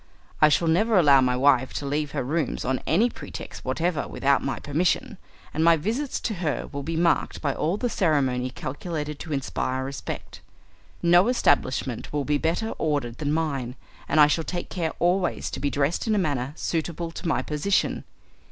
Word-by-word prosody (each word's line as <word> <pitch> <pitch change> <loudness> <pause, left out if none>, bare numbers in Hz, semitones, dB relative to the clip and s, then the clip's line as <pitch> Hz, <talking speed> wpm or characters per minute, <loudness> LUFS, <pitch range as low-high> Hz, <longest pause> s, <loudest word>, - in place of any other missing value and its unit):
I 155 - +8
shall 165 +3 +2
never 210 +7 +3
allow 140 -6 +6
my 125 -1 +1
wife 130 -1 +3
to 145 - -4
leave 145 +1 -1
her - - -1
rooms 150 +2 -2
on 130 +1 0
any 205 +9 +4
pretext - - -8
whatever 170 -2 -1
without 140 0 +1
my 135 - -2
permission, 160 +5 -1 0.3
and 160 - 0
my 165 0 +6
visits 230 - -2
to 225 - -2
her 155 -5 -1
will 140 - -4
be 165 +4 -4
marked 170 +1 +1
by 140 -3 -1
all 170 +8 -1
the 245 - -1
ceremony 135 - +1
calculated 150 +3 -5
to 160 - -7
inspire 130 -2 -2
respect. 135 +1 -6 0.6
No 175 +4 +5
establishment 130 - +1
will 145 -2 -1
be 145 +1 +1
better 165 +8 0
ordered 145 -7 -1
than 145 -2 -1
mine, 140 -6 -1 0.3
and 155 - +3
I 150 - +10
shall 150 +3 +1
take 175 +2 -4
care 165 -3 -2
always 180 +1 0
to - - -5
be 145 - 0
dressed 145 +9 0
in 220 - +2
a - - +1
manner 145 -7 -1
suitable 165 0 -3
to 170 - -6
my 160 - +1
position. 155 +7 0
150 Hz, 185 wpm, -25 LUFS, 140-170 Hz, 0.6 s, I